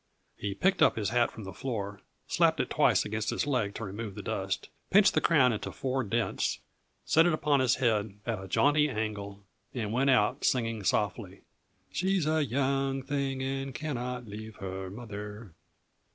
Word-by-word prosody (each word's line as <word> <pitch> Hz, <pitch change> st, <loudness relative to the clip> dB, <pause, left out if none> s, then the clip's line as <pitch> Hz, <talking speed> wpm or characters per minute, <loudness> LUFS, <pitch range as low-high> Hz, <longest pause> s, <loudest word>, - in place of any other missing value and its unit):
He 100 Hz, -1 st, -4 dB
picked 190 Hz, -, +2 dB
up -, -, +6 dB
his 105 Hz, -3 st, -1 dB
hat 120 Hz, 0 st, +2 dB
from 110 Hz, -, -10 dB
the 95 Hz, -, -7 dB
floor, 105 Hz, -6 st, -4 dB, 0.2 s
slapped -, -, +2 dB
it -, -, -1 dB
twice -, -, +3 dB
against 110 Hz, 0 st, -2 dB
his -, -, 0 dB
leg 125 Hz, -8 st, 0 dB
to 115 Hz, -, -5 dB
remove 105 Hz, 0 st, -5 dB
the -, -, -7 dB
dust, -, -, -3 dB, 0.2 s
pinched 200 Hz, +1 st, +6 dB
the -, -, +2 dB
crown 130 Hz, -7 st, +4 dB
into 105 Hz, -, -4 dB
four 130 Hz, 0 st, -1 dB
dents, 115 Hz, +2 st, 0 dB, 0.5 s
set 165 Hz, +2 st, +5 dB
it 175 Hz, -, +2 dB
upon 150 Hz, -2 st, +2 dB
his 130 Hz, -1 st, +3 dB
head 110 Hz, -5 st, 0 dB
at 110 Hz, -5 st, -2 dB
a -, -, -8 dB
jaunty 145 Hz, +9 st, +3 dB
angle 105 Hz, -3 st, -4 dB, 0.3 s
and 110 Hz, -3 st, -2 dB
went 135 Hz, +3 st, +2 dB
out, 125 Hz, +2 st, +3 dB
singing 115 Hz, -3 st, +1 dB
softly: 100 Hz, 0 st, -1 dB, 0.5 s
"She's 190 Hz, -2 st, +1 dB
a 155 Hz, 0 st, +2 dB
young 135 Hz, +1 st, 0 dB
thing, 135 Hz, -1 st, -2 dB
and 135 Hz, 0 st, -3 dB
cannot 125 Hz, -4 st, -3 dB
leave 110 Hz, +1 st, -8 dB
her 95 Hz, -1 st, -5 dB
mother." 105 Hz, -2 st, -8 dB
120 Hz, 175 wpm, -30 LUFS, 105-135 Hz, 0.5 s, up